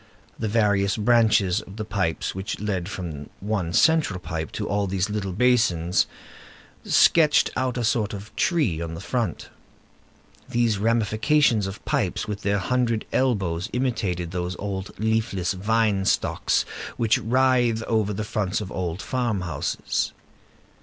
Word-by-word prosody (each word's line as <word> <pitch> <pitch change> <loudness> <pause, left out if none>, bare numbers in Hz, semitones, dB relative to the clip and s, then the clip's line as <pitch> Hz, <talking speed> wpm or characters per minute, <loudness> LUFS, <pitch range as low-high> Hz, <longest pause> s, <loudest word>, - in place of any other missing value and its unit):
The 110 - -1
various 100 -2 +2
branches 110 -4 +3
of 100 - -12
the 110 - -4
pipes 90 -6 -1
which 95 +2 -4
led 95 -4 -2
from 80 -7 -6
one 100 -4 -2
central 155 - +3
pipe 80 -3 -5
to - - -3
all 100 0 0
these 95 +2 -1
little 100 -2 -2
basins 100 -6 +2 0.8
sketched 155 -3 +4
out 130 -1 -1
a 120 - -1
sort 110 -1 +1
of 100 0 -9
tree 140 - +1
on 80 -1 -4
the - - -7
front. 115 - -3 1.0
These 115 -4 +1
ramifications 115 +1 +2
of 95 +1 -8
pipes - - -1
with 105 -1 -4
their 100 0 +1
hundred 115 +2 0
elbows 95 -10 0
imitated 105 -9 -1
those 90 0 -3
old 100 -1 -4
leafless 110 -4 0
vine 105 0 +1
stocks - - +1 0.3
which 115 -2 +2
writhe 120 -2 +2
over 110 -3 0
the 105 +1 -3
fronts 105 -3 -1
of 100 -3 -6
old 90 0 -3
farm 120 -6 -1
houses. 85 -2 -2
105 Hz, 140 wpm, -24 LUFS, 95-115 Hz, 1.0 s, sketched